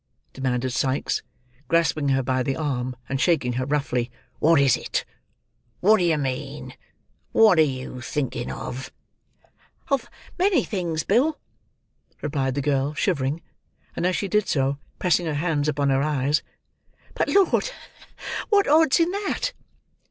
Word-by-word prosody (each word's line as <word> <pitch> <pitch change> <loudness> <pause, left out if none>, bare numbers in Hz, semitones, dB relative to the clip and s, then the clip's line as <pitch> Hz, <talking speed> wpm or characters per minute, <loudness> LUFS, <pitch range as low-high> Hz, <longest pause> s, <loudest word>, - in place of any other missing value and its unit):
demanded 130 -1 -1
Sikes, 130 +1 0 0.5
grasping 160 -3 +2
her 135 -1 +2
by 130 +1 0
the 135 +1 -1
arm, 130 -5 -2
and 135 +1 -2
shaking 155 -8 +2
her 130 +2 -2
roughly. 135 -4 0 0.3
"What 160 0 +5
is 135 -3 +5
it? - - -3 0.7
What 215 +3 +5
do - - +1
you 165 -3 +3
mean? 140 +1 -4 0.6
What 215 -7 +6
are - - +8 0.2
you 130 -1 -7
thinking 120 -2 -3
of?" 130 +1 -6 1.0
"Of 275 -4 0 0.3
many 365 -7 +3
things, 170 -6 -2
Bill," 270 +9 +2 0.8
replied 135 -3 -1
the 140 - -1
girl, 140 +1 0
shivering, 150 -3 0 0.5
and 175 - 0
as 185 - +1
she 200 - -1
did 210 +1 +1
so, 140 0 0 0.2
pressing 175 -1 +2
her 155 - -1
hands 150 -1 0
upon 145 -2 +1
her 135 0 +2
eyes. 145 0 +1 0.7
"But, - - 0
Lord! 400 +5 +3 0.8
What 405 -2 +4
odds 315 +1 +5
in 335 +1 +3
that?" 410 +5 -2
150 Hz, 145 wpm, -24 LUFS, 135-185 Hz, 1.0 s, are